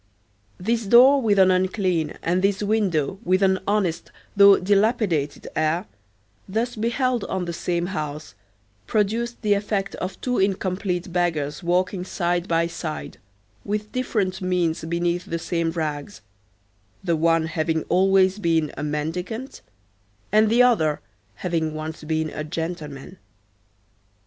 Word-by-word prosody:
This 225 +3 -1
door 260 +5 +7
with 210 -4 +2
an 190 -1 +6
unclean, 185 -4 0
and 180 +2 +1
this 200 +1 +1
window 195 -5 0
with 185 +2 +2
an 190 -1 +3
honest 195 -5 0 0.2
though 200 0 +8
dilapidated 195 - +1
air, 155 +4 0 0.6
thus 230 +5 -1
beheld 235 +1 0
on 190 -1 -2
the 170 - -4
same 170 +1 -1
house, 155 -4 -5 0.5
produced 225 +3 0
the 210 -1 +3
effect 200 -1 -1
of 185 +1 -5
two 250 -1 -1
incomplete 185 -2 -1
beggars 160 -4 -1
walking 180 +1 0
side 175 -1 -1
by 165 0 +2
side, 170 -2 -6 0.4
with 210 +1 -3
different 205 -7 -1
miens 180 -4 0
beneath 170 +1 -1
the 170 - -3
same 170 0 -1
rags, 150 -8 -4 0.8
the 170 -3 +1
one 165 0 +2
having 160 0 -1
always 190 +1 +3
been 165 -5 +1
a - - -6
mendicant, 165 - -4 0.7
and 215 +1 +4
the 240 +3 +5
other 160 -12 +2 0.4
having 160 -3 -2
once 155 0 -6
been 155 0 -1
a 150 - -5
gentleman. 160 0 -6
180 Hz, 130 wpm, -23 LUFS, 165-205 Hz, 0.8 s, though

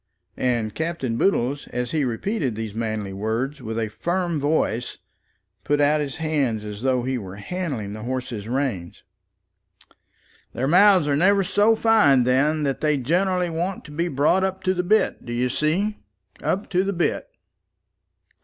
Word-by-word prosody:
And 120 -4 0
Captain 160 -7 -2
Boodle, 130 -3 +1
as 125 0 -3
he 155 -3 +1
repeated 130 - -2
these 110 -1 -5
manly 110 -3 -3
words 115 +8 -2
with 110 -1 -5
a 115 -1 0
firm 175 - -1
voice, 140 -5 0 0.7
put 145 +1 +1
out 150 +1 +3
his 140 -3 -4
hands 140 -9 -1
as 105 0 -7
though 130 -1 +1
he 130 0 -1
were 95 -3 -8
handling 120 - -4
the 110 - -7
horse's 125 -3 -4
rein. 120 -9 -2 1.6
"Their 130 +3 -1
mouths 185 0 +5
are 145 - +2
never 195 +6 +4
so 205 +4 +3
fine 215 - +4
then, 145 +5 +2
and 135 -1 0
they 150 -1 +1
generally 180 +6 +1
want 175 +4 -3
to 150 - -11
be 170 +4 -1
brought 155 +5 +2
up 190 0 -2
to 185 - +2
the 180 - 0
bit, 210 +5 +1
d'ye 120 +1 -1
see? 180 - 0 0.4
up 200 +3 -1
to 185 0 +2
the 200 +1 -1
bit. 175 -2 -1
145 Hz, 160 wpm, -23 LUFS, 120-175 Hz, 1.6 s, mouths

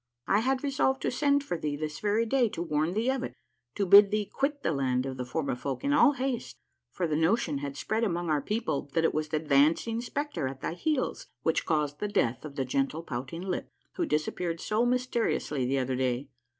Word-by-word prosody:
I 200 - +3
had 260 +3 0
resolved 270 -1 +1
to - - +1
send 285 +2 +2
for 175 - -3
thee 150 -2 -2
this 150 +1 -4
very 210 +2 +1
day 245 0 +2
to 170 - -4
warn 155 +1 0
thee 230 +4 +2
of 265 -1 -2
it: - - -5 0.4
to 200 - 0
bid 200 +2 +9
thee 210 0 0
quit 280 +6 -2
the - - +1
land 130 -3 0
of 135 -1 -4
the 125 - -4
Formifolk 140 - -3
in 285 +1 +2
all 290 0 +6
haste, 260 -2 -3 0.3
for 180 - -2
the 155 -2 0
notion 160 -2 +1
has 140 -1 -5
spread 220 +2 -1
among 175 -5 -1
our 150 -2 +1
people 210 - -2
that 165 - +3
it 165 - +2
was 155 0 -1
the 155 - -1
dancing 155 +10 +2
spectre 285 - -3
at 130 0 -7
thy - - -2
heels 275 - -1 0.2
which 160 - +1
caused 150 -2 0
the 210 - -1
death 125 - 0
of 150 -2 -8
the 135 -2 -1
gentle 135 +5 -1
Pouting 135 +5 -5
Lip, 185 -2 -3 0.2
who 345 - -1
dis 155 0 +1
appeared 170 -2 -3
so 220 +7 +1
mysteriously 235 - 0
the 135 +2 +1
other 130 0 0
day. 130 +1 -1
165 Hz, 220 wpm, -29 LUFS, 145-235 Hz, 0.4 s, bid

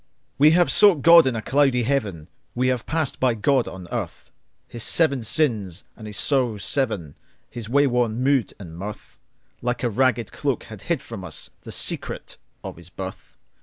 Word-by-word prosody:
We 150 +2 +7
have 175 - +3
sought 190 -9 +5
God 170 -3 +8
in 130 - 0
a 110 - -4
cloudy 135 -2 +2
Heaven, 105 - -2 0.3
We 130 +1 +1
have 125 -2 -2
passed 160 -4 -2
by 125 -3 +2
God 130 +4 +1
on 90 -2 -9
earth:His 120 - -8
seven 140 0 +2
sins 110 - 0
and 110 - -10
his 105 - -6
sorrows 125 -8 +1
seven, 105 - -1 0.4
His 115 -2 -7
wayworn 125 -4 +2
mood 135 -3 +2
and 85 -5 -10
mirth, 100 +4 -9 0.4
Like 125 +1 -2
a 120 - +1
ragged 120 0 +1
cloak 140 -4 -2
have 110 -4 -11
hid 165 +4 -2
from 115 -4 -8
usThe 85 -4 -8
secret - - -3 0.2
of - - -8
his 85 0 -13
birth. 95 +1 -9
120 Hz, 165 wpm, -23 LUFS, 105-140 Hz, 0.4 s, God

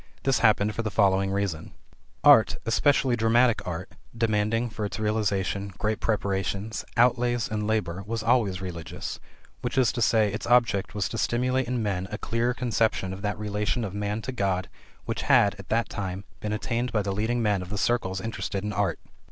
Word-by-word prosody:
This 135 -1 +2
happened 105 0 +3
for 115 - -2
the 110 - -2
following 95 -2 +2
reason: 95 -5 -2 0.5
Art, - - +7
especially 130 +1 +3
dramatic 115 +1 +3
art, 90 +1 -4 0.3
demanding 115 +1 +1
for 110 - -5
its 100 - -3
realization 100 -2 -1
great 110 +1 -1
preparations, 100 0 -1
outlays, 120 -1 +3
and 105 -1 -2
labor, 95 -5 -1
was 115 0 -3
always 110 -6 +2
religious, 85 -3 -6 0.4
i.e., 120 -2 +2
its 110 - -4
object 115 -5 +2
was 100 -2 0
to 115 - -4
stimulate 125 +4 +1
in 125 -2 -1
men 95 -3 -2
a 105 - -3
clearer 120 +2 -1
conception 110 -6 0
of 95 - -8
that 105 0 -2
relation 105 +3 -1
of 100 -3 -4
man 105 +1 -3
to 130 - -3
God 95 -6 -1 0.4
which - - -3
had, 100 - +4
at 100 - -11
that 115 +1 +1
time, 95 -1 -4 0.2
been 105 - -3
attained 115 +3 -2
by 105 -2 +1
the 100 - -2
leading 115 +4 0
men 105 -3 +1
of 90 - -8
the 105 - -3
circles 100 -4 0
interested 95 -1 -4
in 105 0 -3
art. 100 -4 0
105 Hz, 175 wpm, -26 LUFS, 100-115 Hz, 0.5 s, Art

